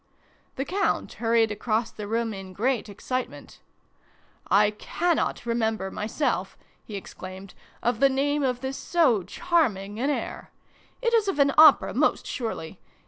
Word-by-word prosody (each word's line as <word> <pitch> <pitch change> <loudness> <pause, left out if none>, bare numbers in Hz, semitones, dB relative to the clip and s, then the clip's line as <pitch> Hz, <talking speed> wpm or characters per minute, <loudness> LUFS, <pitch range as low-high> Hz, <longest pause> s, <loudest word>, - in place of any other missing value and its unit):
The 270 - -2
Count 390 +6 -1
hurried 225 -1 +2
across 220 +2 -1
the 210 -1 -7
room 225 +1 -1
in 190 -1 -8
great 235 +2 -1
excitement. 255 +5 -5 0.5
" - - -29 0.2
I 210 - +2
cannot 330 +8 -1
remember 220 -4 -1
myself," 225 +7 -2 0.3
he 215 - -8
exclaimed, 190 0 -9 0.2
" - - -30
of 240 -2 0
the 275 +1 +5
name 285 +2 0
of 250 -3 0
this 265 0 -4
so 300 - +2
charming 210 - 0
an 270 +4 0
air! 290 - -4 0.5
It 470 -1 +1
is 445 -3 +3
of 390 - -1
an 280 -1 +4
opera, 310 -2 +7
most - - +1
surely. 205 - -5
235 Hz, 150 wpm, -26 LUFS, 210-280 Hz, 0.5 s, opera